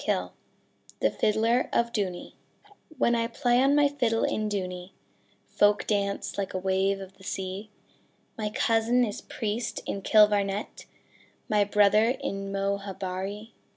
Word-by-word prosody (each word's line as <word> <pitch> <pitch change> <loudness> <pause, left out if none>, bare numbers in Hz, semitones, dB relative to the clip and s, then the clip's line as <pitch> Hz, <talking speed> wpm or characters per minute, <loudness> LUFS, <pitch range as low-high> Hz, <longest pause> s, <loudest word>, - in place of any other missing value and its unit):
17 - - -1 0.7
THE - - +2
FIDDLER 225 +4 +1
OF 235 0 +1
DOONEY 185 -4 -3 0.6
When 235 - +3
I 230 -1 +1
play 245 0 +2
on 275 +2 +4
my 290 -1 +5
fiddle 245 -6 0
in 215 0 0
Dooney, 180 -2 -4 0.5
Folk 205 0 +2
dance 200 -1 -1
like 195 -1 -3
a - - +1
wave 190 +1 +1
of 195 0 -11
the - - -15
sea; 190 +2 -5 0.7
My 215 -1 -3
cousin 230 +3 +2
is 210 - -5
priest 220 +1 -4
in 200 - -4
Kilvarnet, 205 -1 +2 0.6
My 210 -1 +3
brother 210 +4 +4
in 195 0 -4
Moharabuiee. 195 +1 -3
205 Hz, 135 wpm, -27 LUFS, 195-225 Hz, 0.7 s, my